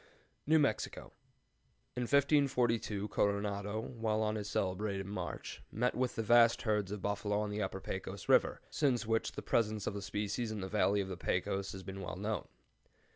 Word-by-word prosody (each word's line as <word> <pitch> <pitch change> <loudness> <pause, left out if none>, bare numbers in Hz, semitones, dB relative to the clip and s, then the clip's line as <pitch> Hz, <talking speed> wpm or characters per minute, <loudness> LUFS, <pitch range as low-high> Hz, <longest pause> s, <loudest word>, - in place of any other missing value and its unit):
NEW 160 +1 +6
MEXICO. 145 -2 0 0.8
In 125 - -1
1542 125 -7 +2
Coronado, 100 +1 0
while 110 -2 -1
on 105 0 +1
his 105 -2 -4
celebrated 95 +1 -1
march, 100 +2 -5
met 125 +3 +1
with 125 -1 -1
vast 115 +1 +5
herds 105 -4 +1
of 105 -2 -5
buffalo 105 0 0
on 105 -1 -2
the 105 +1 -2
Upper 95 0 -2
Pecos 95 +1 -5
River, - - +4
since 130 -6 +1
which 115 0 0
the - - -6
presence 110 -3 +1
of - - -1
the 100 - -4
species 105 +3 -2
in 105 -2 -4
the 95 - -3
valley 100 0 +2
of 95 - -4
the 95 -2 -5
Pecos 95 +2 -1
has 95 0 -8
been 95 +1 -6
well 90 - -5
known. 105 +1 -3
105 Hz, 175 wpm, -34 LUFS, 100-115 Hz, 0.8 s, NEW